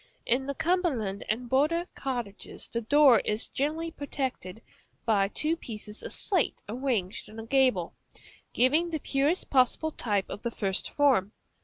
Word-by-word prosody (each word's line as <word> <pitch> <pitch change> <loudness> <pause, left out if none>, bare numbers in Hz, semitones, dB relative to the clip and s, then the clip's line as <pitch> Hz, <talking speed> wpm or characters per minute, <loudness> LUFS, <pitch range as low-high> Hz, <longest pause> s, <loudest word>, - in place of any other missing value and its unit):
In 260 +3 +1
the 280 - -3
Cumberland 275 - 0
and 235 +3 -1
border 305 +7 +2
cottages 240 -7 -4
the 235 - -3
door 275 0 +6
is 210 +1 -2
generally 315 +4 -2
protected 260 - -4 0.5
by 205 -3 +3
two 305 +10 0
pieces 215 -7 -8
of - - -7
slate 370 -6 0
arranged 225 -6 -2
in 215 - -12
a 225 - -7
gable, 250 -9 +2 0.6
giving 300 +8 +3
the 320 -2 -2
purest 285 +6 0
possible 270 +4 +3
type 205 -8 -1
of - - -7
the 235 - -2
first 195 -4 +2
form. 250 -9 +2
255 Hz, 150 wpm, -28 LUFS, 215-290 Hz, 0.6 s, door